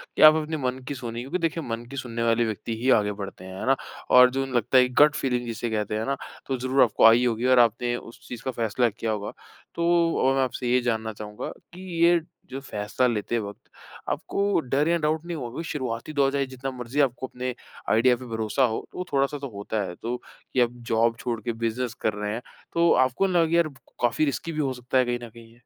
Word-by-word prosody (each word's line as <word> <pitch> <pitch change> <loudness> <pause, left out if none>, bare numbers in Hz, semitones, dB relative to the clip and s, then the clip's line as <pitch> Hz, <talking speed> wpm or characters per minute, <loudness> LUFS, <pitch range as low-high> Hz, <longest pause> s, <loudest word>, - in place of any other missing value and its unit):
कि - - 0
आप 155 0 +10
अपने 155 0 -2
मन 130 -1 -2
की 145 - -2
सुनी। 120 -2 -5
क्योंकि 135 +8 -2
देखिए 165 -1 -1
मन 115 0 -4
की 140 - -8
सुनने 115 -2 -3
वाले 115 0 +3
व्यक्ति 110 +1 -4
ही 130 - +1
आगे 105 -1 0
बढ़ते 100 -2 -7
हैं, 95 0 -8
है - - -4
ना। 135 - +5 0.3
और 125 0 +8
जुन 135 0 -2
लगता 120 +3 +3
है 125 0 +6
कि 125 - -11
गट 150 -1 +4
फीलिंग 125 -3 -1
जिसे 115 0 -3
कहते 105 -1 -1
हैं 110 - -2
ना 140 - 0 0.3
तो 135 -1 -1
ज़रूर 130 +2 +1
आपको 115 -1 +3
आई 115 +2 +7
होगी 120 0 0
और 130 -1 +5
आपने 120 +1 +3
उस 120 -1 -11
चीज़ 120 -1 -7
का 130 - -2
फैसला 115 +1 +1
किया 110 +1 -3
होगा। 105 -1 -3 0.4
तो 170 0 +2
अ, - - +3
मैं 135 - +3
आपसे 125 -1 -3
ये 125 0 +4
जानना 110 -2 -1
चाहूँगा 105 0 -6 0.2
कि 180 - -10 0.2
ये 170 0 +5 0.4
फैसला 105 -1 -2
लेते 115 0 -1
वक़्त 100 -2 -8 0.4
आपको 200 -2 0
डर 140 +2 0
या 170 0 +3
डाउट 155 +1 0
नहीं 170 -2 -4
हुआ? 120 -4 -5
क्यूँकि 160 +7 -6
शुरुआती 130 0 -4
दौर 140 -1 +2
है 140 - +1
जितना 130 +1 -6
मर्ज़ी 125 +4 -4
आपको 130 -1 0
अपने 125 0 -4 0.4
आइडिया 125 +3 +4
पे 130 - -10
भरोसा 115 +3 0
हो - - -1
तो 180 - -5
थोड़ा-सा 140 +2 +1
तो 140 - -5
होता 105 +1 -2
है। 90 -2 -6
तो 120 +2 -4 0.4
कि 130 - +2
अब 120 0 0
जॉब 115 +1 +3
छोड़ 120 -2 -2
के 120 +2 -2
बिज़नेस 120 +1 -2
कर 110 - +1
रहे 105 0 -3
हैं 120 - -4 0.3
तो 170 0 +4
आपको 130 +10 0
ना 175 -2 +4
यार 170 -1 +4 0.3
काफ़ी 120 +6 +2
रिसकी 140 +4 -2
भी 155 - -4
हो 135 -3 0
सकता 125 +1 -2
है 130 - +4
कहीं 120 0 -1
न - - -14
कहीं 115 0 -15
ये? 120 - -21
125 Hz, 240 wpm, -25 LUFS, 115-135 Hz, 0.4 s, आप